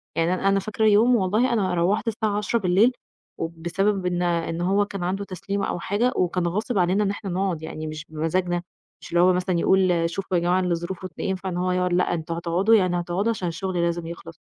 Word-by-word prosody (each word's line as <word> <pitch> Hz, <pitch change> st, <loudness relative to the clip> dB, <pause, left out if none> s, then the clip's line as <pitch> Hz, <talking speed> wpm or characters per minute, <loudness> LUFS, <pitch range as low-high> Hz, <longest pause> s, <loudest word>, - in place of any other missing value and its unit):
يعني 165 Hz, +2 st, +1 dB
أنا 185 Hz, +1 st, -1 dB
أنا 195 Hz, 0 st, +3 dB
فاكر 215 Hz, +2 st, -3 dB
يوم 220 Hz, +4 st, +5 dB
والله 220 Hz, +5 st, +2 dB
أنا 195 Hz, -5 st, +1 dB
روّحت 180 Hz, +6 st, +1 dB
الساعة 215 Hz, -2 st, -1 dB
22:00 220 Hz, +3 st, 0 dB
بالليل 195 Hz, +5 st, +4 dB, 0.5 s
وبسبب 175 Hz, +4 st, -1 dB
إن 180 Hz, -1 st, 0 dB
إن 170 Hz, -1 st, -1 dB
هو 195 Hz, +3 st, +2 dB
كان 200 Hz, -2 st, -6 dB
عنده 190 Hz, +3 st, -1 dB
تسليم 195 Hz, +2 st, -4 dB
أو -, -, -2 dB
حاجة 215 Hz, +8 st, 0 dB
وكان 180 Hz, -1 st, 0 dB
غاصب 210 Hz, +6 st, -2 dB
علينا 185 Hz, +3 st, +2 dB
إن 200 Hz, -, 0 dB
احنا 200 Hz, 0 st, -6 dB
نقعُد 180 Hz, -2 st, -1 dB
يعني 155 Hz, 0 st, -6 dB
مش 155 Hz, 0 st, -6 dB
بمزاجنا، 175 Hz, +3 st, -1 dB, 0.4 s
مش -, -, -11 dB
اللي 170 Hz, 0 st, +3 dB
هو 185 Hz, +1 st, +5 dB
مثلًا 180 Hz, -1 st, 0 dB
يقول 180 Hz, -3 st, +3 dB
شوفوا 185 Hz, +1 st, -2 dB
يا -, -, +1 dB
جماعة 175 Hz, +2 st, +2 dB
اللي 180 Hz, -2 st, +1 dB
ظروفه 175 Hz, +2 st, -5 dB
ت 170 Hz, -, -20 dB
ينفع 190 Hz, -1 st, -2 dB
إن 175 Hz, -, -4 dB
هو 180 Hz, +1 st, 0 dB
يقعُد 180 Hz, 0 st, 0 dB
لأ 180 Hz, 0 st, +2 dB
أنتم 165 Hz, 0 st, -3 dB
هتقعدوا 175 Hz, +6 st, +2 dB
يعني 185 Hz, -4 st, +2 dB
هتقعدوا 175 Hz, +5 st, -1 dB
عشان 190 Hz, -5 st, -3 dB
الشغل 175 Hz, +1 st, -2 dB
لازم 170 Hz, -1 st, -1 dB
يخلص. 165 Hz, -1 st, -9 dB
180 Hz, 220 wpm, -24 LUFS, 170-200 Hz, 0.5 s, يوم